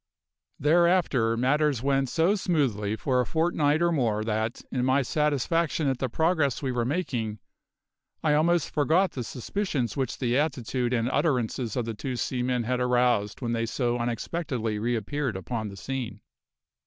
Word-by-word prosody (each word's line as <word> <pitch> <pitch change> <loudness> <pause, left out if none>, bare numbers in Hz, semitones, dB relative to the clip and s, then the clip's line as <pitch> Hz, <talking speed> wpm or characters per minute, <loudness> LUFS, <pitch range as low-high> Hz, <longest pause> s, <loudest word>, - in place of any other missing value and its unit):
Thereafter 155 -7 +3
matters 135 0 +2
went 135 -1 +1
so 165 +8 +2
smoothly 135 - 0
for 125 +3 +1
a - - -1
fortnight 160 -1 +1
or 170 - +3
more 115 -9 +1
that, 110 +1 -2
in 125 -2 -1
my 130 +2 +3
satisfaction 150 +3 0
at 130 -2 0
the 130 - -1
progress 160 -2 +1
we 130 - 0
were 120 -2 0
making, 120 -8 -2 0.9
I 155 -2 +3
almost 165 +2 +2
forgot 160 +6 +2
the 125 - -4
suspicions 130 - -3
which 130 -3 -2
the 125 -2 0
attitude 130 -4 -1
and 115 -2 +1
utterances 125 - 0
of 125 - -1
the 115 - -3
two 125 +4 -4
seamen 125 0 -1
had 125 +2 -1
aroused 125 -4 +1
when 120 -1 -1
they 115 0 -1
so 120 0 -1
unexpectedly 120 -2 -2
reappeared 120 +2 -1
upon 110 +4 -4
the 100 -1 -9
scene. 130 +2 -5
130 Hz, 155 wpm, -27 LUFS, 115-150 Hz, 0.9 s, Thereafter